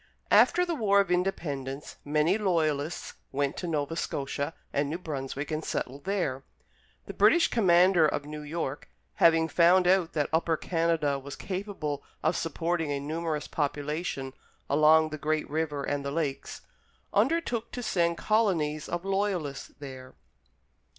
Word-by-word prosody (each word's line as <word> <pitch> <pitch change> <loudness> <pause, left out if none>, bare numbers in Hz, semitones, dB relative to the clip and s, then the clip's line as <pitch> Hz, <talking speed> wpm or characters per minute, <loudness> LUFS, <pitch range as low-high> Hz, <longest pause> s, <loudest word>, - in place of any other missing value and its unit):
After 360 - +5
the 345 - -2
war 205 -8 +3
of 195 -3 +1
Independence, 150 -7 -2
many 150 +5 +2
Loyalists 160 -5 0 0.2
went 140 +1 -1
to 180 - -4
Nova 155 -1 -1
Scotia 140 -1 -3 0.2
and 140 0 0
New 160 - -2
Brunswick 140 -4 -5
and 155 +1 -2
settled 140 0 -4
there. 175 -10 -1 0.6
The - - -7
British 335 0 +5
Commander 180 -5 +5
of 145 -1 -2
New 150 0 -7
York, 150 -2 -4 0.3
having 165 -1 +5
found 175 +3 +5
out 180 -2 +3
that 150 -3 0
Upper 160 0 +2
Canada 165 -5 0
was 135 0 -8
capable 185 -7 -4 0.2
of 170 - +2
supporting 165 0 -1
a 140 - -1
numerous 155 +1 -3
population 145 -2 -3 0.4
along 155 +2 +5
the 155 0 -6
great 155 +1 -1
river 150 -2 -2
and 145 0 -2
the 140 - -3
lakes, 140 -2 -3 0.5
undertook 235 0 +1
to 245 - -4
send 170 -5 +1
colonies 170 -9 +1
of 175 +2 -3
Loyalists 195 -8 -1
there. 130 -2 -10
160 Hz, 145 wpm, -28 LUFS, 145-180 Hz, 0.6 s, After